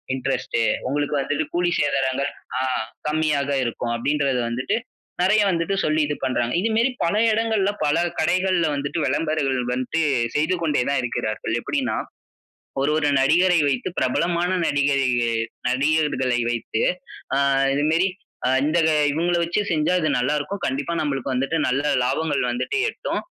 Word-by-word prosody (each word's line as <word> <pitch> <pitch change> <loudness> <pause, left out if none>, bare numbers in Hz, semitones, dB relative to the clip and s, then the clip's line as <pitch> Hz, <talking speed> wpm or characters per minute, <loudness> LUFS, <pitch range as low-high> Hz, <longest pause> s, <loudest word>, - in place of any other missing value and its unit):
Interest. 130 -2 -2 0.3
உங்களுக்கு 145 +2 -1
வந்துட்டு 145 +3 -1
கூலி 175 0 +2
சேதாரங்கள், 135 -1 0 0.3
அ - - 0 0.5
கம்மியாக 150 -2 0
இருக்கும் 120 0 -3
அப்டின்றது 140 +1 0
வந்துட்டு, 130 - -1 0.4
நெறைய 210 +4 +4
வந்துட்டு 175 +2 0
சொல்லி 155 +1 +2
இது 145 0 -2
பண்றாங்க. 125 -2 0
இது 215 +5 0
மாரி 230 +4 +3
பல 170 +3 +1 0.2
இடங்கள்ல, 220 -3 +1
பல 145 +2 +2 0.2
கடைகள்ல 180 +1 +2
வந்துட்டு 140 +4 -3
வெளம்பரங்கள் 150 -2 0
வந்துட்டு 130 +6 -1 0.3
செய்து 155 +5 +2
கொண்டே 150 -5 +1
தான் 140 - +1
இருக்கிறார்கள். 110 -3 -3
எப்டின்னா, 270 - -2 0.8
ஒரு 140 +2 +2
ஒரு 150 -2 +1
நடிகரை 170 +6 +4
வைத்து 130 +1 -1
பிரபலமான 170 +7 0
நடிகரை 145 -2 +2 0.6
நடிகர்களை 140 -2 +1
வைத்து, 115 -1 -2 0.5
அ - - +2 0.4
இது 145 - 0
மாரி 170 +4 +3 0.6
இந்த 155 +3 +2 0.3
இவங்கள 170 +4 0
வச்சு 170 +4 -1
செஞ்சா 155 +2 +1
இது 155 -2 0
நல்லா 125 +4 +1
இருக்கும், 200 +7 -5
கண்டிப்பா 140 +5 -2
நம்மளுக்கு 135 -3 -2
வந்துட்டு 135 +5 0
நல்ல 135 +3 0 0.2
லாபங்கள் 145 +4 0
வந்துட்டு 125 - -2
எட்டும், - - -4
150 Hz, 140 wpm, -23 LUFS, 135-170 Hz, 0.8 s, நெறைய